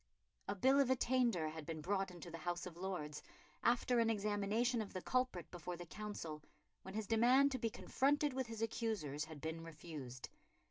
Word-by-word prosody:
A 200 - -1
Bill 265 +8 +5
of 275 -2 +4
Attainder 240 -10 +3
had 160 0 -6
been 160 +1 -4
brought 195 +4 0
into 175 -1 -9
the 165 - -6
House 175 +1 -2
of 180 -3 -7
Lords, 175 -5 -4 0.4
after 245 +1 +3
an 230 -1 +4
examination 215 +3 +1
of 210 - -6
the 185 - -3
culprit 255 -10 0
before 175 0 -5
the 175 - -7
Council, 170 -5 -5 0.4
when 190 +1 -8
his 220 -1 -1
demand 250 +6 +5
to 260 - -1
be 230 - +1
confronted 285 +5 +2
with 260 -1 -1
his 225 -1 -3
accusers 205 -11 -1
had 155 -1 -9
been 160 +2 -3
refused. 150 -6 -7
200 Hz, 185 wpm, -39 LUFS, 165-235 Hz, 0.4 s, Bill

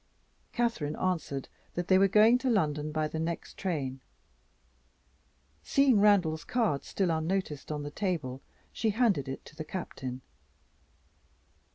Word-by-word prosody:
Catherine 230 -12 -1
answered 165 -7 -2 0.3
that 175 0 -2
they 185 -1 +5
were 195 - +6
going 215 +5 +6
to 260 - 0
London 150 -8 +1
by 155 0 0
the 160 - -4
next 165 +1 -4
train. 140 -8 -3 1.6
Seeing 275 -6 +4
Randal's 185 -7 +4
card 220 - 0
still 190 -4 0
unnoticed 160 -2 -2
on 150 -1 -3
the 145 - -5
table, 150 -9 -2 0.3
she 220 - 0
handed 205 - +2
it 135 - -6
to - - -14
the 155 - -5
Captain. 130 -7 -6
170 Hz, 135 wpm, -30 LUFS, 150-205 Hz, 1.6 s, were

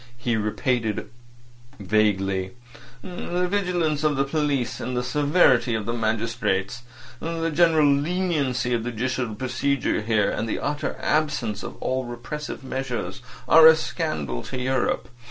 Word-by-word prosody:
He 120 0 -1
repeated 110 +1 -1 0.7
vaguely. 95 -2 +1 0.5
"The 180 0 -2
vigilance 175 -6 0
of 150 -1 +2
the 135 - +2
police—and 135 -4 -1
the 125 - 0
severity 140 -4 +3
of 110 -2 -3
the 115 - -2
magistrates. 115 -2 -1 0.4
The 165 0 -2
general 160 -1 +4
leniency 145 -4 +1
of 115 -2 0
the 120 - -2
judicial 125 -1 -2
procedure 130 +1 0
here, 105 -2 +1
and 110 - -3
the - - -1
utter 145 +1 -2
absence 145 -10 0
of - - -7
all 130 0 -2
repressive 125 +5 -6
measures, 130 -2 -4 0.3
are 160 0 +9
a 160 - +9
scandal 75 - -3
to - - -5
Europe. 130 +1 0
130 Hz, 135 wpm, -24 LUFS, 115-150 Hz, 0.7 s, are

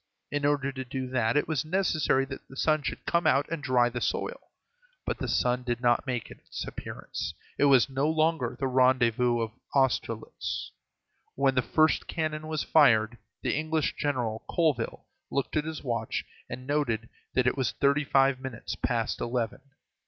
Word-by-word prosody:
In 145 0 +1
order 140 -2 +1
to 130 -1 -5
do 130 0 -4
that 120 0 +2
it 145 - +1
was 155 -4 0
necessary 155 -6 +1
that 135 0 -9
the 135 - -13
sun 155 0 +2
should - - -5
come 170 -1 +2
out 140 0 +3
and 165 -3 -2
dry 125 -4 +3
the 120 0 -4
soil. - - -2 0.6
But - - -2
the - - -2
sun 125 0 +1
did 120 -1 -2
not 120 0 +2
make 125 -3 -3
its - - -7
appearance. - - -6 0.2
It - - +5
was 135 -3 +6
no 135 +2 0
longer 160 -5 +1
the 135 - 0
rendezvous 125 -2 +3
of 110 -1 -2 0.2
Austerlitz. 125 -4 -1 0.6
When 135 0 +3
the 125 - +3
first 155 +4 +2
cannon 155 -1 -2
was 155 -1 -1
fired, 120 -6 +4 0.2
the - - +1
English 155 +1 0
general, 120 -6 -1
Colville, 150 -9 0 0.2
looked 140 - -2
at 155 -1 +1
his 160 -1 -5
watch, 120 -4 -2 0.2
and 130 - -6
noted 130 -6 0 0.3
that 130 - +3
it 125 - +2
was 130 -4 0
thirty 140 +1 +2
five 135 -1 +3
minutes 130 -3 -6
past 120 -2 -1
eleven. 120 -2 -2
135 Hz, 175 wpm, -28 LUFS, 120-150 Hz, 0.6 s, was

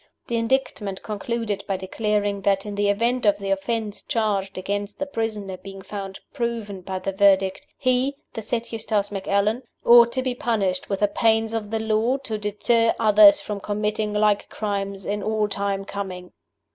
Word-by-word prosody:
The 235 - -3
Indictment 230 -5 -1
concluded 215 -1 -3
by 195 - -1
declaring 205 +1 -1
that, 195 0 +1
in 205 - -5
the 205 0 +1
event 235 +5 +1
of 205 -2 +4
the 195 -1 -3
offense 205 +2 -2
charged 205 -6 -1
against 205 +2 -3
the 285 - -2
prisoner 215 -7 -3
being 195 +1 -10
found 195 -2 -7
proven 230 -6 -3
by 190 +1 -4
the 195 - -3
Verdict, 195 +4 +3
he, 255 +1 +1 0.2
the 225 - -4
said 230 +2 -3
Eustace 215 -3 -1
Macallan, 200 +4 0 0.2
"ought 235 0 +8
to 260 - 0
be 255 -1 -1
punished 205 -7 -1
with 195 -1 -2
the 205 - +5
pains 225 +2 +2
of 215 -2 -3
the 225 - -1
law, 220 +4 +1
to 230 -6 -4
deter 225 +3 +2
others 210 -2 +7
from 210 -1 -5
committing 210 +1 -1
like 210 -1 +2
crimes 200 -2 -3
in 205 +1 -2
all 215 0 0
time 200 -1 -2
coming." 185 -3 -6
210 Hz, 170 wpm, -23 LUFS, 200-225 Hz, 0.2 s, ought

